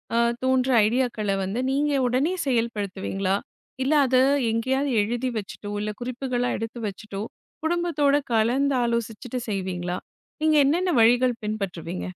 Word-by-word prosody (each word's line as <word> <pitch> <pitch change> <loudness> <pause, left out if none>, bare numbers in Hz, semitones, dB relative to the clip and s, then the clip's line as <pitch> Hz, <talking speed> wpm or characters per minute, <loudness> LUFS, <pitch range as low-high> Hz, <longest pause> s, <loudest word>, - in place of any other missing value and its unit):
ஆ - - +3 0.3
தோன்றும் 260 -1 +3
ஐடியாக்கள 225 -3 0
வந்து 195 +5 -2
நீங்க 290 +2 +1 0.2
உடனே 270 +8 +1
செயல்படுத்துவீங்களா? 200 -5 -1 0.5
இல்ல 275 +4 +2
அத 255 0 +2 0.3
எங்கேயாவது 265 +5 0
எழுதி 240 +5 -1
வச்சிட்டோ, 205 0 -6
இல்ல 210 0 -2
குறிப்புகளா 245 0 -2
எடுத்து 225 +2 -5
வச்சிட்டோ 200 0 -6 0.4
குடும்பத்தோட 320 -4 +2 0.2
கலந்து 255 +5 +2
ஆலோசிச்சுட்டு 235 +1 -2
செய்வீங்களா? 180 -3 -2 0.4
நீங்க 310 0 +3
என்னென்ன 345 +6 +2
வழிகள் 240 +1 +4
பின்பற்றுவீங்க? 185 -5 -4
240 Hz, 120 wpm, -25 LUFS, 210-265 Hz, 0.5 s, வழிகள்